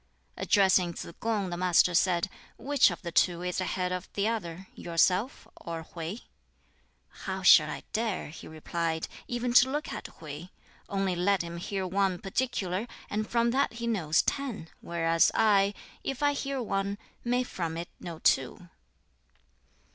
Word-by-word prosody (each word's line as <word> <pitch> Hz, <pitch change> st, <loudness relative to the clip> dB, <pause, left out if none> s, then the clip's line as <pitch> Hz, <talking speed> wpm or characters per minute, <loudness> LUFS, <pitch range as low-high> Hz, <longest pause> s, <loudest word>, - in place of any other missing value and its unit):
Addressing 190 Hz, -3 st, +3 dB
Tsz -, -, -7 dB
kung, 210 Hz, -5 st, -1 dB
the 175 Hz, -, -3 dB
Master 180 Hz, 0 st, +4 dB
said, 175 Hz, +1 st, +3 dB, 0.3 s
"Which 285 Hz, -1 st, +4 dB
of -, -, -7 dB
the 170 Hz, -, -4 dB
two 175 Hz, +1 st, +2 dB
is 180 Hz, +1 st, -1 dB
ahead 180 Hz, 0 st, -1 dB
of 180 Hz, 0 st, -4 dB
the 205 Hz, +1 st, 0 dB
other 190 Hz, -5 st, -3 dB
yourself 180 Hz, +4 st, +1 dB
or 165 Hz, -1 st, -6 dB
Hwķi?" 170 Hz, +7 st, -5 dB, 1.0 s
"How -, -, -3 dB
shall -, -, +8 dB
I -, -, -5 dB
dare," 220 Hz, -7 st, -1 dB
he 155 Hz, -, -10 dB
replied, 160 Hz, +1 st, -3 dB, 0.2 s
"even 240 Hz, -1 st, -2 dB
to 255 Hz, +1 st, +7 dB
look 295 Hz, +3 st, -3 dB
at -, -, -6 dB
Hwķi? 155 Hz, +3 st, -9 dB, 0.4 s
Only 195 Hz, -2 st, 0 dB
let 185 Hz, +1 st, +2 dB
him 170 Hz, 0 st, -6 dB
hear 190 Hz, +2 st, -3 dB
one 190 Hz, 0 st, +1 dB
particular, 195 Hz, -1 st, -2 dB, 0.2 s
and 215 Hz, +1 st, -2 dB
from 235 Hz, 0 st, +2 dB
that 275 Hz, +1 st, +1 dB
he 235 Hz, +1 st, -5 dB
knows 170 Hz, -9 st, +2 dB
ten; 245 Hz, -, -3 dB
whereas 165 Hz, -1 st, +2 dB
I, 205 Hz, -2 st, +4 dB, 0.3 s
if 270 Hz, +1 st, -3 dB
I 290 Hz, 0 st, +4 dB
hear 275 Hz, -1 st, -3 dB
one, 200 Hz, -1 st, -1 dB, 0.3 s
may 245 Hz, +1 st, +1 dB
from 165 Hz, -8 st, -4 dB
it 170 Hz, +1 st, -5 dB
know 170 Hz, -2 st, -7 dB
two." 160 Hz, +5 st, +1 dB
190 Hz, 155 wpm, -29 LUFS, 170-230 Hz, 1.0 s, shall